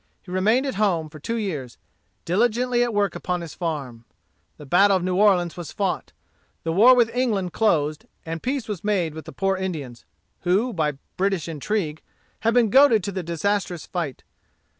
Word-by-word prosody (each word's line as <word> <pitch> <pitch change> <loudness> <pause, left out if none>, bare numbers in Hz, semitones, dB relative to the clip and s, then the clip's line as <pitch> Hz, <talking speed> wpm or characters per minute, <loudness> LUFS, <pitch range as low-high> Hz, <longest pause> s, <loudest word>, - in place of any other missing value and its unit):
He 180 - -11
remained 215 +8 +2
at 270 - -2
home 170 -7 +1
for 155 - -12
two 230 +10 -3
years, 155 - -4 0.5
diligently 240 +6 +1
at 240 - -1
work 205 -2 +1
upon 180 -1 -3
his 165 -3 -7
farm. 140 -9 -4 0.5
The 150 - -11
battle 195 +6 +4
of 180 - -4
New 185 0 0
Orleans 185 -4 +3
was 175 -3 -7
fought. 195 -3 -2 0.5
The 165 - -1
war 235 +8 +7
with 235 -2 +3
England 210 -8 0
closed, 155 -8 +1 0.2
and 165 0 -4
peace 260 -2 -2
was 205 -6 -5
made 190 -7 0
with 160 0 -8
the - - -8
poor 195 0 0
Indians, 155 -11 -5 0.3
who, 200 +7 +1
by 155 -4 0 0.2
British 190 -4 0
intrigue, 160 0 -2 0.4
had 230 +1 +1
been 235 -4 +4
goaded 260 -6 +6
to 200 - -3
the 190 -1 -3
disastrous 175 +1 -2
fight. 165 -8 -4
185 Hz, 180 wpm, -23 LUFS, 165-215 Hz, 0.5 s, war